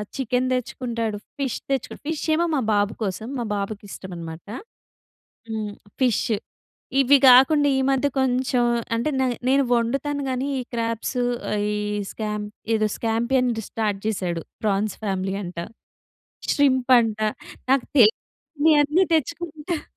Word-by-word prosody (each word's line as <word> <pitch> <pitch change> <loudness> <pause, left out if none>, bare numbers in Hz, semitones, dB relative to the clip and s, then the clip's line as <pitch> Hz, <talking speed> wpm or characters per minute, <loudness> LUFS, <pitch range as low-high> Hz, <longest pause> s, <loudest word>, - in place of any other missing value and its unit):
Chicken 255 -1 0
తెచ్చుకుంటాడు, 230 -3 -2 0.2
fish 270 -4 -1
తెచ్చు 270 -1 -2
fish 315 0 -3
ఏమో 335 +2 +2
మా 275 - +1
బాబు 205 +1 +2
కోసం. 205 +2 -3
మా - - -1
బాబుకి 200 +1 -4
ఇష్టమనమాట. 170 -3 -8 1.1
హ్మ్. 215 -2 -3 0.3
ఫిష్. 250 -5 +2 0.7
ఇవి 275 +1 +6
కాకుండా 285 +4 +6
ఈ - - +2
మధ్య 270 +1 +2
కొంచెం 255 -1 +1 0.3
అంటే 235 +6 0
నే 260 - +3 0.2
నేను 275 +1 +4
వండుతాను 275 +5 0
గానీ, 255 +1 -1
ఈ - - -3
క్రాబ్సు, 230 +2 -1 0.5
ఈ - - -1 0.4
స్కాం 210 -1 -3 0.3
ఏదో 215 -1 +2
స్కాంపియన్‌‌ది 235 +1 0
స్టార్ట్ 210 -3 -1
చేసాడు. 180 -6 -1 0.2
ప్రాన్స్ 210 -1 0
ఫ్యామిలీ 190 -1 -1
అంట. 175 -2 -7 0.9
శ్రీంప్ 260 -3 +2
అంట. 220 -2 -2 0.5
నాకు 270 -1 +4
తెలియనవాన్ని 295 - +3
తెచ్చుకుంటాడు. 320 +1 -2
245 Hz, 120 wpm, -23 LUFS, 215-275 Hz, 1.1 s, ఇవి